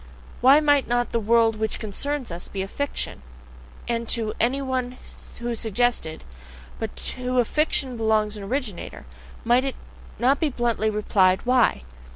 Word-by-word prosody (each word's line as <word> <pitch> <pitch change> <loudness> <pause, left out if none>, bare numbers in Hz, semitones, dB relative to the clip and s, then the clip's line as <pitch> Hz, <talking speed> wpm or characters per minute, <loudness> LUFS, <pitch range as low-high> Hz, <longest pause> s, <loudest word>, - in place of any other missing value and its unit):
Why 270 +4 +7
might 290 -2 +3
not 245 0 0
the 230 - +1
world 225 0 +3
WHICH 220 0 -1
CONCERNS 255 +4 -2
US 170 +1 -7
be 190 -1 -4
a - - -5
fiction? 285 - -3 0.7
And 235 -1 -2
to 220 -2 0
any 250 +4 +2
one 255 -2 -2 0.4
who 240 0 -2
suggested: 225 -7 -1 0.6
"But 225 -1 -4 0.2
to 255 0 -3
a 245 - +4
fiction 275 -3 0
belongs 220 -1 +1
an 210 - -7
originator?" 215 -2 -4 0.4
might 240 +2 +3
it 270 -1 -3 0.4
not 265 +4 +3
be 315 - +1
bluntly 235 -4 0
replied: 195 -3 +2
WHY? 245 - +3
235 Hz, 155 wpm, -24 LUFS, 215-255 Hz, 0.7 s, Why